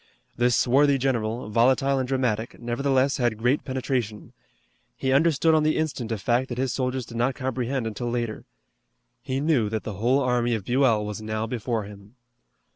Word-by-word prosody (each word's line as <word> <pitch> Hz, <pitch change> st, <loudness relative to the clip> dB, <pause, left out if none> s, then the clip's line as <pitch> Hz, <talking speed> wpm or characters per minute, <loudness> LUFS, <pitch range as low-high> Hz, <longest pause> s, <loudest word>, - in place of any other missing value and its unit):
This 120 Hz, 0 st, +2 dB
swarthy 140 Hz, +4 st, +4 dB
general, 120 Hz, -4 st, -1 dB
volatile 130 Hz, +4 st, +3 dB
and 130 Hz, -, -2 dB
dramatic, 125 Hz, -4 st, -1 dB
nevertheless 135 Hz, +3 st, +1 dB
had 120 Hz, -4 st, 0 dB
great 125 Hz, +6 st, +1 dB
penetration. 130 Hz, -5 st, -3 dB, 0.6 s
He 130 Hz, -, -1 dB
understood 160 Hz, +2 st, +3 dB
on 155 Hz, -, +4 dB
the 155 Hz, 0 st, +1 dB
instant 140 Hz, -7 st, -2 dB
a 110 Hz, -, -1 dB
fact 120 Hz, +5 st, 0 dB
that 120 Hz, -, -5 dB
his 130 Hz, -1 st, -1 dB
soldiers 130 Hz, -1 st, -2 dB
did 115 Hz, -, -8 dB
not 125 Hz, +2 st, +1 dB
comprehend 130 Hz, -1 st, -2 dB
until 115 Hz, +2 st, -3 dB
later. 120 Hz, -2 st, -3 dB, 0.8 s
He 130 Hz, 0 st, -2 dB
knew 140 Hz, -8 st, +2 dB
that 110 Hz, 0 st, -3 dB
the 110 Hz, -, -5 dB
whole 125 Hz, +4 st, +3 dB
army 120 Hz, -3 st, +1 dB
of 105 Hz, -4 st, -5 dB
Buell 120 Hz, -4 st, +2 dB
was 105 Hz, +1 st, -5 dB
now 110 Hz, 0 st, -3 dB
before 115 Hz, -1 st, -2 dB
him. 100 Hz, +2 st, -13 dB
125 Hz, 175 wpm, -25 LUFS, 115-135 Hz, 0.8 s, swarthy